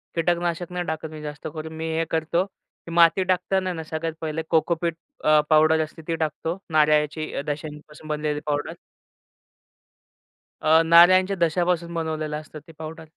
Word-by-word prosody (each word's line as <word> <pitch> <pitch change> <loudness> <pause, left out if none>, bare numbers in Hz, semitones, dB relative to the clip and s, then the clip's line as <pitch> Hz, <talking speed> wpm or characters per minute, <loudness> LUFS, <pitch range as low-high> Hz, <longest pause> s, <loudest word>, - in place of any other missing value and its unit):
कीटकनाशक 175 +1 -1
नाही 180 0 -3
टाकत 160 -1 -4
मी 155 -1 -9
जास्त 150 -1 -7
करून, 160 0 -7
मी 160 - -4
हे 165 - +1
करतो, 165 +3 0
की 180 -3 -17
माती 170 +2 +5
टाकताना 185 +1 0
आहे 180 - -3
ना 160 - -5
सगळ्यात 160 +1 -4
पहिले 160 0 -2
कोकोपीट 165 0 +1 0.3
अ, 155 0 +5
पावडर 155 0 +5
असते 155 +1 -10
ती 165 - 0
टाकतो 160 +2 -3
नारळाची 155 0 +2 0.2
दशेपासून 150 +1 -7
बनलेली 150 -1 -2
पावडर. 145 -1 -2 1.9
अ, 160 +1 +5
नारळ्यांच्या 185 +4 +6
दशापासून 170 0 +1
बनवलेलं 155 -2 -3
असतं 155 0 -11
ते 165 - -13
पाऊडर. 160 +1 -8
160 Hz, 150 wpm, -24 LUFS, 155-170 Hz, 1.9 s, नारळ्यांच्या